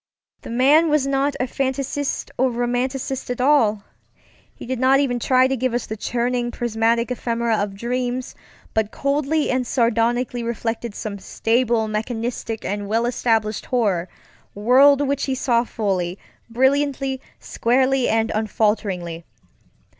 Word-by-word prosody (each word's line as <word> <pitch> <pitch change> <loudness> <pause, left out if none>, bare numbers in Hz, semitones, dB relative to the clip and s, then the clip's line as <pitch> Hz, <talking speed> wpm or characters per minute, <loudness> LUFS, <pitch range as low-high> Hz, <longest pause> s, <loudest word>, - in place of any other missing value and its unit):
The - - -9
man 280 +7 +4
was 300 -2 +2
not 275 +1 0
a 255 - +1
fan 265 +1 -1
taisiste 275 +1 -3
or 260 +1 +2
romanticist 250 +2 -2
at 245 - -2
allŌĆöhe 250 -7 +3 0.7
did 255 0 -4
not 265 +1 +4
even 250 -4 0
try 255 +2 +3
to 270 - 0
give 255 -1 -1
us 245 - -1
the 215 - -5
churning, 240 +2 -1
prismatic 235 0 0
ephemera 235 -2 -1
of 205 -1 -2
dreams, 245 +3 -3 0.4
but 220 -1 +1
coldly 290 +4 0
and 255 -1 0
sardonically 240 +1 +1
reflected 230 -1 -3
some 200 -2 -5
stable, 230 +2 0
mechanistic, 225 +1 -3
and 205 +1 -3
well 225 +3 +1
established 225 -3 0
horror 200 -8 0 0.5
world 260 +7 +5
which 280 0 0
he 265 - -1
saw 240 -2 +2
fully, 190 -6 -2 0.3
brilliantly, 270 +2 +1 0.2
squarely, 260 +2 +1
and 225 0 +1
unfalteringly. 205 -6 -1
240 Hz, 135 wpm, -21 LUFS, 225-260 Hz, 0.7 s, world